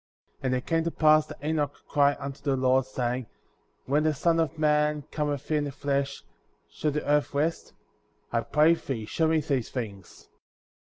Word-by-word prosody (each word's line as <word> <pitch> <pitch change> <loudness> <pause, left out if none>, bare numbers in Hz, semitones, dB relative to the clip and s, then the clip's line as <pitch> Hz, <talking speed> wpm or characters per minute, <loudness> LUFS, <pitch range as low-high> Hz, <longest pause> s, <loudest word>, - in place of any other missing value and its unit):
54. 135 - -1
And 130 - +1
it 125 - -3
came 165 -1 +1
to - - +1
pass 155 -1 +4
that 155 - -11
Enoch 150 -2 0
cried 145 0 +3
unto 140 0 -6
the 140 -2 +1
Lord,^ 130 0 +2
saying: 125 -2 -2 0.6
When 145 +3 +2
the 155 -1 +1
Son 165 +3 +2
of 160 -1 +1
Man^ 150 -1 +2
cometh 145 -1 -2
in 150 -1 +2
the 145 - -4
flesh,* 140 0 -2 0.5
shall 155 - -1
the 150 +1 -2
earth 145 0 +1
rest?^ 155 +4 -1 0.6
I 115 - +1
pray 155 +6 +4
thee, 130 -9 -4
show 160 +8 0
me 160 0 +2
these 140 -6 -1
things. 100 -7 -7
145 Hz, 185 wpm, -27 LUFS, 130-155 Hz, 0.6 s, pass